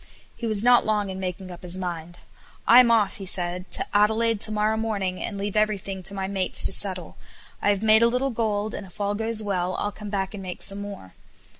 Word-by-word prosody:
He 235 - -5
was 215 -1 +2
not 245 0 +5
long 210 -2 -1
in 190 - -7
making 185 0 -6
up 175 - -11
his 180 0 -1
mind. 175 -2 -6 0.5
"I'm 240 0 +7
off," 215 -3 +1
said 180 0 0
he - - -1
"to - - +1
Adelaide 220 +1 +2
to 215 - +4
morrow 215 +1 0
morning, 205 -5 -3
and 205 - -5
leave 200 +1 -4
everything 200 -3 -1
to 195 +2 -1
my 190 -1 -3
mates 190 -2 +1
to - - +3
settle. 185 -3 +1 0.4
I - - +1
have 205 0 0
made 220 0 +5
a 235 - +5
little 250 +3 -1
gold, 215 -2 -2
and 195 - -7
if 185 - -18
all 205 0 -1
goes 220 +1 -1
well 185 -3 -2
I'll 205 - -3
come 210 0 -9
back 195 -1 -3
and 205 - -7
make 185 -2 -6
some 200 0 -2
more." 200 - -9
205 Hz, 230 wpm, -24 LUFS, 185-215 Hz, 0.5 s, I'm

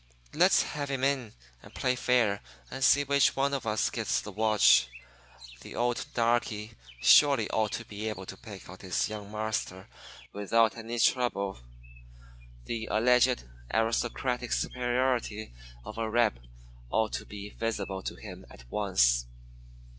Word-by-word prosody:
Let's - - +4
have 145 -1 -4
him 135 -2 -2
in 135 -5 0 0.3
and - - -16
play 125 0 0
fair 120 -5 +2 0.3
and 135 +1 -4
see 145 +2 +5
which 140 -1 +2
of 135 -2 0
us 105 0 +1
gets - - 0
the 105 - -8
watch. 110 - +4 0.7
The - - -11
old 120 0 -1
darky 115 -2 0 0.3
surely 140 -7 +6
ought 110 -1 0
to 115 - -4
be 110 0 -5
able 95 -3 -6
to - - -8
pick 105 -5 -11
out 95 +1 -12
his 95 +1 -1
'young 105 -2 -7
marster' 105 -3 -3 0.5
without 110 +2 +2
any 115 +1 -5
trouble. 110 - +1 1.1
The 115 - -4
alleged 125 - +3 0.3
aristocratic 120 +2 0
superiority 120 - -1 0.3
of - - -7
a 110 -1 -1
'reb' 115 - +2 0.5
ought 110 - 0
to - - -4
be 105 0 -8
visible 100 -4 -3
to - - -5
him - - -10
at - - -14
once. - - +2
115 Hz, 140 wpm, -29 LUFS, 105-125 Hz, 1.1 s, surely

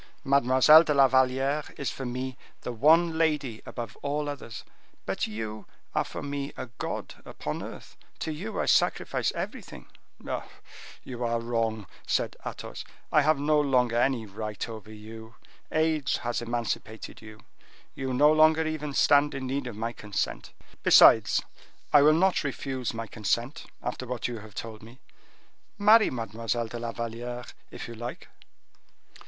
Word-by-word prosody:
Mademoiselle 140 +3 +6
de 150 -3 0
la 135 -1 +7
Valliere 130 +3 +1
is 140 - -2
for 135 - -5
me 130 +1 -4 0.3
the - - -4
one 160 +7 +4
lady 150 -8 0
above 115 -4 -6
all 145 +1 -2
others; 140 -6 -7 0.4
but - - -1
you 110 -1 -6 0.3
are - - +2
for - - -7
me 140 0 -4
a - - -4
god - - -5
upon - - -5
earth—to 160 - -8
you 150 -7 -5
I - - +1
sacrifice - - +2
everything." - - -6 1.2
"You 125 -1 -5
are 115 0 0
wrong," 115 -2 -1 0.2
said - - 0
Athos; - - -7 0.3
"I 150 - +5
have 155 +1 +3
no 150 +2 +2
longer 125 -4 +2
any 120 -1 +1
right 105 0 -5
over 110 -2 -9
you. 110 +1 -11 0.4
Age 155 -2 +1
has 120 0 -2
emancipated 115 -2 -4
you; 110 -1 -12 0.5
you 135 -1 -4
no 145 +4 +5
longer 155 +1 +5
even 150 -2 -3
stand 145 0 +4
in 135 -1 -4
need 135 0 -2
of 120 - -6
my 115 +2 -3
consent. 105 -3 -3 0.3
Besides, - - +7 0.5
I 145 - +8
will 150 +2 +6
not 180 +2 +3
refuse 135 -3 -3
my 115 0 -4
consent 115 +5 -2 0.2
after 125 +1 -4
what 125 -1 -2
you 120 -2 -5
have 105 -1 -13
told 110 -1 -6
me. 115 +4 -14 0.8
Marry 215 +2 +6
Mademoiselle 115 0 -3
de 120 - -6
la 115 0 -3
Valliere, 120 +1 -5 0.2
if - - -8
you 115 - -8
like." 120 +2 -7
125 Hz, 150 wpm, -27 LUFS, 115-145 Hz, 1.2 s, I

